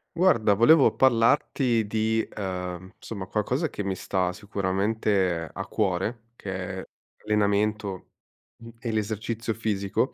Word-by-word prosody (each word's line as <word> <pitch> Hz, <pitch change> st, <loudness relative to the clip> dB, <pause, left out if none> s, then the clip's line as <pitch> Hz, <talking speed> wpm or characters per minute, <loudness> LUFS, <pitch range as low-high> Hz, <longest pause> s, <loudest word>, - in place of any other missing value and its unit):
Guarda 115 Hz, -, +4 dB
volevo 135 Hz, +7 st, +6 dB
parlarti 120 Hz, -1 st, +3 dB
di, 110 Hz, +1 st, 0 dB
uhm, 90 Hz, -2 st, -5 dB
somma, 100 Hz, -4 st, -7 dB
qualcosa 125 Hz, -, -1 dB
che 105 Hz, -, -5 dB
mi 95 Hz, -1 st, -2 dB
sta 90 Hz, -1 st, -1 dB
sicuramente 100 Hz, -2 st, 0 dB
a 95 Hz, -, -5 dB
cuore 105 Hz, +3 st, -1 dB
che 100 Hz, -, -7 dB, 0.3 s
è -, -, -9 dB, 0.4 s
allenamento, 105 Hz, -2 st, 0 dB, 0.5 s
mhmm, 115 Hz, 0 st, -12 dB
e 115 Hz, 0 st, -3 dB
l'esercizio 110 Hz, +1 st, -2 dB
fisico, 105 Hz, +2 st, -1 dB
105 Hz, 120 wpm, -26 LUFS, 95-115 Hz, 0.5 s, volevo